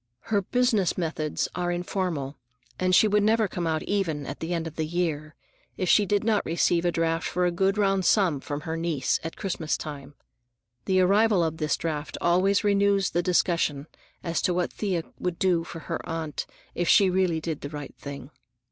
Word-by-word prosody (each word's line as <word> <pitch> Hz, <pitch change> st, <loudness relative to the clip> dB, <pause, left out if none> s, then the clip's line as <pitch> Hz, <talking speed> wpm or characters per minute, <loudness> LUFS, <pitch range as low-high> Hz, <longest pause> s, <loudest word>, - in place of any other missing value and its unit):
Her 200 Hz, -, +4 dB
business 225 Hz, -3 st, +1 dB
methods 160 Hz, -3 st, -1 dB
are 175 Hz, 0 st, -1 dB
informal, 175 Hz, -5 st, -2 dB, 0.4 s
and 185 Hz, 0 st, +3 dB
she 215 Hz, -, +6 dB
would 210 Hz, 0 st, +3 dB
never 220 Hz, +1 st, +3 dB
come 175 Hz, -2 st, -3 dB
out 160 Hz, -1 st, -1 dB
even 165 Hz, -8 st, -1 dB
at 140 Hz, -, -6 dB
the 165 Hz, +2 st, -4 dB
end 165 Hz, -2 st, -1 dB
of 160 Hz, -1 st, -7 dB
the 160 Hz, -1 st, -2 dB
year, 155 Hz, -3 st, -2 dB, 0.4 s
if 185 Hz, -, -1 dB
she 205 Hz, -2 st, +5 dB
did 205 Hz, +1 st, +1 dB
not 215 Hz, -2 st, +2 dB
receive 170 Hz, +1 st, +1 dB
a 175 Hz, -, +3 dB
draft 165 Hz, 0 st, 0 dB
for 180 Hz, 0 st, 0 dB
a 175 Hz, -, +2 dB
good 190 Hz, +3 st, +1 dB
round 195 Hz, -2 st, +2 dB
sum 180 Hz, -6 st, +3 dB
from 145 Hz, +2 st, -5 dB
her 160 Hz, +1 st, -4 dB
niece 165 Hz, -5 st, 0 dB
at 165 Hz, -, -6 dB
Christmas 170 Hz, -5 st, -2 dB
time. 145 Hz, -2 st, -8 dB, 0.7 s
The 185 Hz, -1 st, +3 dB
arrival 200 Hz, 0 st, +4 dB
of 160 Hz, -1 st, -2 dB
this 155 Hz, -2 st, 0 dB
draft 155 Hz, -2 st, -4 dB
always 185 Hz, +4 st, +2 dB
renews 200 Hz, -1 st, +2 dB
the 175 Hz, -, +1 dB
discussion 170 Hz, -5 st, +1 dB, 0.4 s
as 170 Hz, -1 st, -1 dB
to 180 Hz, -, +1 dB
what 180 Hz, -1 st, -1 dB
Thea 185 Hz, -6 st, -1 dB, 0.2 s
would 180 Hz, -2 st, -2 dB
do 180 Hz, -3 st, +2 dB
for 165 Hz, 0 st, -8 dB
her -, -, -4 dB
aunt 160 Hz, -2 st, -4 dB, 0.3 s
if 175 Hz, -1 st, -1 dB
she 195 Hz, -2 st, +6 dB
really 180 Hz, -3 st, +1 dB
did 160 Hz, -2 st, -4 dB
the 145 Hz, -, -5 dB
right 145 Hz, -1 st, -7 dB
thing. 140 Hz, -1 st, -8 dB
175 Hz, 195 wpm, -26 LUFS, 160-190 Hz, 0.7 s, she